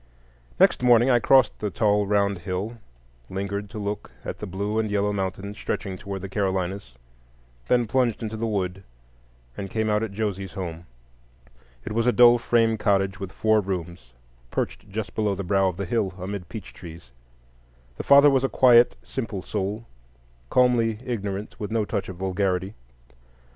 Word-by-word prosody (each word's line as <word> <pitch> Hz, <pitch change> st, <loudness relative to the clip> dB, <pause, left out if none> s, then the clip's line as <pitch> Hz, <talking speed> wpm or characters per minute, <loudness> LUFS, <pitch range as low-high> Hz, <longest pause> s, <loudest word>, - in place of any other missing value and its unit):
Next -, -, +4 dB
morning 120 Hz, +1 st, +5 dB
I 120 Hz, -, +5 dB
crossed 130 Hz, +2 st, +4 dB
the 105 Hz, -, -2 dB
tall 105 Hz, -1 st, +1 dB
round 100 Hz, -2 st, +1 dB
hill, 95 Hz, +6 st, -4 dB, 0.5 s
lingered 100 Hz, +1 st, -4 dB
to 110 Hz, -, -9 dB
look 105 Hz, 0 st, -4 dB, 0.2 s
at -, -, -5 dB
the -, -, -5 dB
blue 100 Hz, +4 st, -2 dB
and 110 Hz, -1 st, -1 dB
yellow 105 Hz, 0 st, 0 dB
mountains 95 Hz, +1 st, -4 dB
stretching 95 Hz, -3 st, -3 dB
toward 95 Hz, +1 st, -6 dB
the 100 Hz, -, -5 dB
Carolinas, 95 Hz, -, -2 dB, 0.7 s
then 120 Hz, -1 st, +3 dB
plunged 120 Hz, -1 st, 0 dB
into 110 Hz, 0 st, -4 dB
the 115 Hz, +1 st, -2 dB
wood, 95 Hz, -3 st, -2 dB, 0.7 s
and 95 Hz, -1 st, -6 dB
came 110 Hz, +1 st, -1 dB
out 105 Hz, 0 st, +2 dB
at 110 Hz, -2 st, -3 dB
Josie's 100 Hz, -2 st, -3 dB
home. 85 Hz, -3 st, -6 dB, 1.0 s
It -, -, -5 dB
was 115 Hz, +2 st, 0 dB
a -, -, +6 dB
dull 120 Hz, 0 st, +6 dB
frame 115 Hz, -2 st, +2 dB
cottage 95 Hz, -2 st, +1 dB
with 95 Hz, -1 st, -6 dB
four 110 Hz, +2 st, +2 dB
rooms, 85 Hz, -9 st, -6 dB, 0.4 s
perched 105 Hz, -, -4 dB
just 105 Hz, +1 st, -5 dB
below 105 Hz, -2 st, 0 dB
the 100 Hz, -, -4 dB
brow 95 Hz, +1 st, +2 dB
of 90 Hz, -2 st, -3 dB
the 100 Hz, -, -3 dB
hill, 95 Hz, -1 st, -1 dB
amid 95 Hz, -1 st, -6 dB
peach 110 Hz, -5 st, -8 dB
trees. 80 Hz, -7 st, -12 dB, 0.9 s
The -, -, -4 dB
father 140 Hz, +1 st, +7 dB
was 135 Hz, -1 st, +2 dB
a 135 Hz, -, +1 dB
quiet, 120 Hz, -2 st, +5 dB
simple 110 Hz, -8 st, -5 dB
soul, 105 Hz, +2 st, -3 dB, 0.6 s
calmly 120 Hz, -3 st, +3 dB
ignorant, 100 Hz, -4 st, -4 dB
with 105 Hz, -, -4 dB
no 110 Hz, -1 st, 0 dB
touch 100 Hz, -2 st, -3 dB
of 95 Hz, -, -7 dB
vulgarity. 95 Hz, +1 st, -1 dB
100 Hz, 170 wpm, -25 LUFS, 95-110 Hz, 1.0 s, father